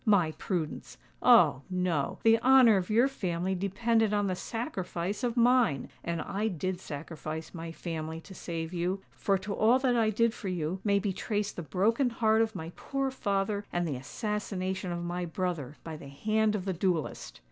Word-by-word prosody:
_'—My 185 -7 +4
prudence! 165 -1 -4 0.2
Oh! 130 - +6
no:—the 185 +5 +2
honour 250 -3 +7
of 180 -1 -2
your 235 +5 +4
family 185 -8 -2
depended 210 +3 +1
on 205 0 +1
the 185 -2 0
sacrifice 200 - -4
of 240 0 -1
mine! 240 - +3
And 170 -2 -2
I 210 +3 -1
did 185 -1 -2
sacrifice 155 0 -6
my 165 -1 -6
family 160 -1 -5
to 190 - -12
save 165 -2 -5
you;—for 190 +2 -1
to 195 +2 -5
all 225 +5 +4
that 260 -2 +1
I 225 -2 +3
did 230 +2 +2
for 205 - -7
you 180 0 -2
may 200 -1 +3
be 200 -1 -1
traced 205 +1 -2
the - - -4
broken 220 - +1
heart 225 -1 +2
of 225 0 0
my 160 +1 -5
poor 275 -1 -2
father 200 -3 -1
and 175 -1 0
the 145 - -2
assassination 190 - -3
of 175 0 -3
my 175 +1 -3
brother 170 -5 -3
by 160 -1 -6
the 140 - -10
hand 215 +8 +1
of 190 -3 -3
the 190 - 0
duellist!" 175 -3 -2
190 Hz, 180 wpm, -30 LUFS, 170-220 Hz, 0.2 s, honour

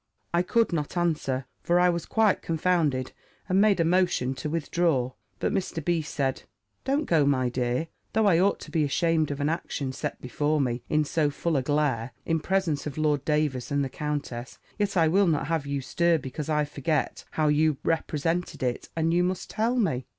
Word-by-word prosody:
I 170 - +4
could 225 +2 +1
not 150 +1 -2
answer; 150 -6 0 0.2
for 175 +1 +2
I 180 0 +5
was 170 -1 -2
quite 220 -3 +2
confounded; 160 -6 0 0.4
and 190 +2 +3
made 205 -3 +4
a 165 - +3
motion 175 -7 +2
to 135 +3 -5
withdraw: 160 -5 0 0.3
but - - -1
Mr. 180 -5 -2
B. 170 -2 +2
said, 140 -3 -2 0.4
"Don't 285 +3 0
go, 160 - +3
my 130 -3 +2
dear: 125 +5 -1 0.3
though 220 0 +3
I 175 -5 +5
ought 195 +2 +2
to - - -10
be 160 -3 +2
ashamed 160 +1 +1
of 145 0 -4
an 145 - 0
action 150 -4 -2
set - - -4
before 145 +4 0
me 125 -3 0
in 155 0 +2
so 150 -1 +1
full 160 +3 -2
a 135 - +2
glare, 135 -4 0
in 165 -1 +1
presence 165 -5 0
of 145 - -6
Lord 150 -3 +1
Davers 150 -5 0
and 140 -1 +1
the - - -4
countess; 140 -4 -4 0.2
yet 200 -2 0
I 165 -2 +5
will 190 +4 +4
not 155 -3 +1
have 160 -2 -1
you 140 -1 -2
stir 170 +5 +2
because 140 +2 -6
I 150 -1 +2
forget 150 +1 -2
how 155 -1 +2
you 150 0 +3
represented 165 0 -1
it, 125 -1 -2
and 165 0 +1
you 175 +1 +3
must 185 0 -2
tell 230 +3 0
me." 135 - 0
155 Hz, 200 wpm, -27 LUFS, 140-175 Hz, 0.4 s, I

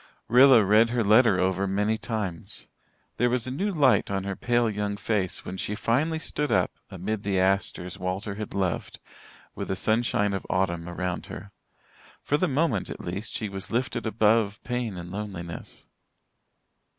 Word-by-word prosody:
Rilla 125 -1 +7
read 110 +4 +5
her 120 -1 +1
letter 110 -1 +5
over 95 +1 +1
many 105 +3 +1
times. 105 -7 -4 0.5
There 120 +1 +3
was 125 -1 0
a 130 - -3
new 190 +10 -1
light 140 -8 +3
on 95 -1 -1
her 100 0 -3
pale 120 +2 +1
young 105 -1 -2
face 100 -3 -1
when 95 - -5
she 105 - -3
finally 140 +9 +1
stood 150 -2 -2
up, - - +2 0.2
amid 100 +3 -3
the 100 -2 0
asters 95 -1 0
Walter 95 +3 -3
had 105 0 -6
loved, 95 -3 -2 0.6
with - - -5
the 95 - -1
sunshine 110 -1 +1
of 95 - -3
autumn 85 -3 0
around 90 0 -3
her. 100 - -9 0.7
For 145 - +1
the 185 - +1
moment 140 - 0
at - - -6
least, 95 +6 -5
she 110 - -2
was 95 -1 -7
lifted 120 -1 -1
above 110 -1 +2
pain 120 -6 -3
and 85 0 -7
loneliness. 95 -4 -7
105 Hz, 165 wpm, -26 LUFS, 95-120 Hz, 0.7 s, Rilla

